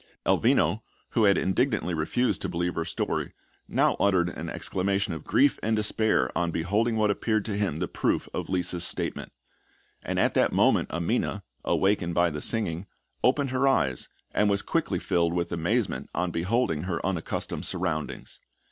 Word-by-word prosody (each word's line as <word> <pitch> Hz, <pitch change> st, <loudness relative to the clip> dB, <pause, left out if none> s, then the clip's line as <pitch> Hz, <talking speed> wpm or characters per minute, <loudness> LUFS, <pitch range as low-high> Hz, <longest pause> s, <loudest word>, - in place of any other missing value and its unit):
Elvino, 85 Hz, +8 st, +3 dB, 0.3 s
who 115 Hz, -3 st, +4 dB
had 100 Hz, -1 st, +5 dB
indignantly 95 Hz, -2 st, +1 dB
refused 85 Hz, +11 st, 0 dB
to -, -, -2 dB
believe 85 Hz, +1 st, -1 dB
her 85 Hz, -, -1 dB
story, 85 Hz, -, -2 dB, 0.3 s
now -, -, +2 dB
uttered 95 Hz, -3 st, +3 dB
an -, -, -6 dB
exclamation 100 Hz, 0 st, -1 dB
of 80 Hz, -, -7 dB
grief 140 Hz, +1 st, +3 dB
and 110 Hz, +1 st, +1 dB
despair 110 Hz, +1 st, +1 dB
on 85 Hz, -1 st, +1 dB
beholding 105 Hz, +8 st, 0 dB
what 105 Hz, -1 st, +3 dB
appeared 110 Hz, 0 st, 0 dB
to 105 Hz, -, -3 dB
him 100 Hz, -7 st, -1 dB
the 90 Hz, +1 st, -2 dB
proof -, -, -1 dB
of -, -, -4 dB
Lisa's 90 Hz, -2 st, 0 dB
statement; -, -, -2 dB, 0.7 s
and -, -, -3 dB
at -, -, +2 dB
that -, -, +3 dB
moment -, -, +3 dB
Amina, 85 Hz, 0 st, -1 dB, 0.2 s
awakened 95 Hz, -3 st, +1 dB
by 85 Hz, -1 st, +3 dB
the 75 Hz, 0 st, -5 dB
singing, 100 Hz, -5 st, -1 dB, 0.4 s
opened 135 Hz, +1 st, +2 dB
her 130 Hz, +1 st, +2 dB
eyes, 65 Hz, -, +1 dB, 0.2 s
and 105 Hz, -, +2 dB
was 100 Hz, -1 st, +1 dB
quickly -, -, 0 dB
filled 85 Hz, -1 st, +1 dB
with 85 Hz, -1 st, -1 dB
amazement 100 Hz, +7 st, -1 dB
on 90 Hz, -1 st, 0 dB
beholding 90 Hz, -2 st, 0 dB
her 90 Hz, -2 st, -2 dB
unaccustomed 90 Hz, -4 st, -2 dB
surroundings. 85 Hz, -5 st, -3 dB
95 Hz, 165 wpm, -27 LUFS, 85-110 Hz, 0.7 s, had